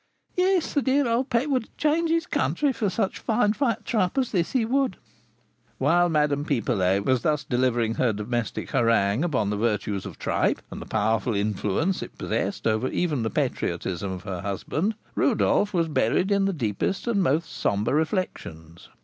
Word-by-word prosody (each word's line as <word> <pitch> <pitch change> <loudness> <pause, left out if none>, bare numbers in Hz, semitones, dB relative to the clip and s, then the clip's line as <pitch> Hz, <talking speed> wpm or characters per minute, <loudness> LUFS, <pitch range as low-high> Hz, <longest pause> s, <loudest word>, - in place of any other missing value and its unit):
Yes, 365 -1 +2
the 285 - +2
dear 270 0 +2
old 235 +3 0
pet 240 +4 +1
would 255 -4 0
change 320 +2 +1
his 330 +1 +1
country 290 -5 0
for 215 -4 -1
such 195 0 -1
fine 215 -2 +1
fat 230 -3 -1
tripe 210 -2 0
as 260 -3 +1
this, 175 -5 0
he 250 -4 +2
would." 260 -3 0 0.8
While 175 +7 +3
Madame 150 -2 +1
Pipelet 100 - +1
was 130 -2 +2
thus 150 0 0
delivering 120 -3 +1
her 120 0 +1
domestic 110 +2 -3
harangue 115 +1 +2
upon 125 -12 0
the 105 - -1
virtues 105 -3 -1
of - - -9
tripe - - 0
and - - -7
the - - -9
powerful 110 +2 0
influence 105 - 0
it - - -8
possessed - - -2
over 110 +3 +1
even 150 -3 -1
the 110 - -1
patriotism 95 -2 -2
of 90 -1 -6
her 95 -4 -5
husband, 145 - -2 0.2
Rodolph 205 - +2
was 170 -3 +1
buried 180 +5 +1
in 200 -1 +3
the 195 - +1
deepest 125 - -2
and 230 -5 +1
most 160 0 +1
sombre 100 +5 0
reflections. 115 - -3
150 Hz, 175 wpm, -25 LUFS, -, 0.8 s, While